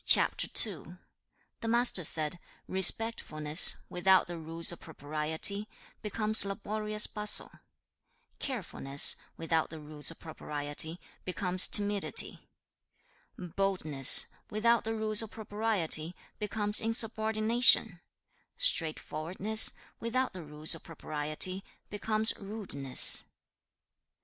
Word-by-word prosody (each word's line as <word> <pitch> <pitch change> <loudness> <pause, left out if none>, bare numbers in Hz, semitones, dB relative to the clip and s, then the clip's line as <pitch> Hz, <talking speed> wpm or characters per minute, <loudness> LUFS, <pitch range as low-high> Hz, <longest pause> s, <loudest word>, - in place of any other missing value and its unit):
The 180 -4 +2 0.7
Master 235 -5 +1
said, 155 +2 -1 0.3
'Respectfulness, 180 -6 +3
without 190 +1 +1
the 175 -1 -9
rules 165 +2 -2
of 175 - -12
propriety, 160 +7 -2 0.3
becomes 215 0 +3
laborious 210 +1 -3
bustle; 210 -1 0 0.9
carefulness, 165 - +1 0.2
without 165 -1 -3
the 160 - -11
rules 150 0 -1
of 165 - -10
propriety, 150 +1 -5 0.2
becomes 185 0 0
timidity; 205 -1 +2 0.9
boldness, 175 -6 +3 0.2
without 230 +2 -1
the 225 0 -4
rules 215 -1 0
of 225 - -9
propriety, 205 -7 -4 0.2
becomes 210 0 0
insubordination; 225 -2 +2 0.6
straightforwardness, 185 - +1 0.3
without 255 +2 -4
the 185 - -10
rules 150 +1 -2
of 165 - -6
propriety, 155 +4 -2 0.3
becomes 215 +1 0
rudeness. 195 - +3
190 Hz, 90 wpm, -28 LUFS, 160-215 Hz, 0.9 s, Respectfulness